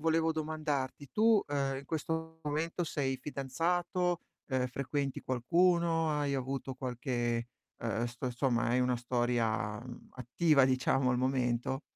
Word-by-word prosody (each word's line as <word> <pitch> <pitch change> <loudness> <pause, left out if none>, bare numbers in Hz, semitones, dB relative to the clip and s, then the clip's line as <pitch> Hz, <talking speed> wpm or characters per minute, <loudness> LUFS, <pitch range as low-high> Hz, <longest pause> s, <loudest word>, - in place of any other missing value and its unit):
volevo 165 +1 +2
domandarti: 150 -3 -2
tu, 220 -1 +4
uhm, 140 -2 0
in 140 - -10
questo 160 +2 -3
momento 160 +4 -1
sei 135 -4 -1
fidanzato, 170 +6 -1 0.3
uhm, 130 -2 +1
frequenti 140 +1 -2
qualcuno, 165 +5 +2
hai 145 -2 0
avuto 135 0 -3
qualche, 120 -2 -2 0.3
uhm, 115 0 -1
st 120 +2 -3
somma 120 -1 +1
hai 125 +2 +3
una 125 0 +2
storia, 120 -4 0
mhmm, 120 0 -10
attiva 135 +4 +3
diciamo 130 0 +2
al 125 - +2
momento? 130 0 0
135 Hz, 130 wpm, -32 LUFS, 125-160 Hz, 0.3 s, tu